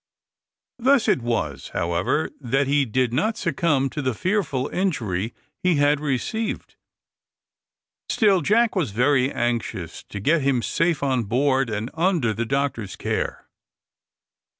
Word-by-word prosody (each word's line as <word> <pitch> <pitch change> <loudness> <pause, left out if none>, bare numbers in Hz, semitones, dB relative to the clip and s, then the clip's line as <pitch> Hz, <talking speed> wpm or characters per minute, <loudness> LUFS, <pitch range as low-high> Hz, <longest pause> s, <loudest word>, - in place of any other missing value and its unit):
Thus 260 0 +3
it - - +3
was, 120 0 -2
however, 85 - 0
that 135 +1 0
he 140 +1 +2
did 125 +1 0
not 215 - 0
succumb 160 - +1
to 150 - -3
the 130 -4 -1
fearful 160 - 0
injury 115 - -1 0.3
he 180 -2 +3
had 145 0 +3
received. 150 - -3 1.3
Still 200 -5 +3
Jack 230 +3 +2
was 175 - 0
very 130 +5 +2
anxious 115 -8 -2
to 100 - -5
get 155 +10 +2
him 135 -3 +1
safe 165 -3 0
on 130 -4 +1
board, 130 +3 +1
and 110 +3 -3
under 165 - +1
the 115 +2 -3
doctor's 135 -7 -2
care. - - -3
135 Hz, 130 wpm, -23 LUFS, 120-170 Hz, 1.3 s, Thus